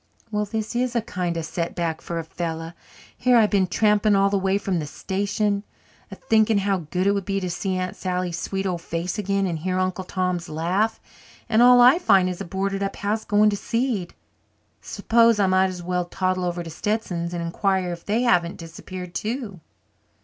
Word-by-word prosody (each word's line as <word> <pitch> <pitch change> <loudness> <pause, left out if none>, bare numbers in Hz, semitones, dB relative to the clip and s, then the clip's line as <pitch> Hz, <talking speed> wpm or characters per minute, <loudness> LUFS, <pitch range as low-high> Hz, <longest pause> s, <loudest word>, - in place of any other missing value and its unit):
Well, 210 0 0
this 220 +2 -4
is 245 0 0
a 235 - +2
kind 180 -6 -3
of 165 - -3
setback 170 -1 -3
for 170 - -5
a 165 - -2
fellow. 165 0 -5 0.4
Here 250 0 +3
I've 215 -2 +4
been 195 -3 +3
tramping 210 +1 +3
all 195 0 +3
the 200 - +2
way 190 +1 +1
from 195 -3 -1
the 150 - -4
station, 200 +5 -1 0.5
a - - -8
thinking 220 -1 +2
how 195 -5 -1
good 185 +2 0
it 200 - +4
would 200 -1 -1
be 195 +1 -1
to 180 -2 -3
see 190 +1 -2
Aunt 185 0 -3
Sally's 180 -2 -2
sweet 195 0 -3
old 180 -3 -2
face 170 +4 -3
again, 195 -1 0
and 170 -4 -2
hear 185 +3 -2
Uncle 185 0 -1
Tom's 180 -2 -2
laugh, 185 +8 0 0.5
and 230 -1 +3
all 245 0 +8
I 250 +7 +7
find 195 - +4
is 180 +1 -4
a - - -4
boarded 195 +2 -2
up 195 0 -2
house 215 +2 -2
going 210 +1 +3
to - - -1
seed. 230 -4 -2 0.7
S'pose 230 -1 +3
I 200 - +4
might 185 0 +3
as 180 -1 -7
well 180 0 -1
toddle 185 0 -1
over 175 0 -2
to 165 - -8
Stetsons' 175 -2 -2
and 175 -1 -3
inquire 185 +1 0
if 170 - -9
they 220 +4 0
haven't 175 -7 +2
disappeared, 175 +2 -8
too." 220 -4 -4
190 Hz, 200 wpm, -23 LUFS, 175-210 Hz, 0.7 s, all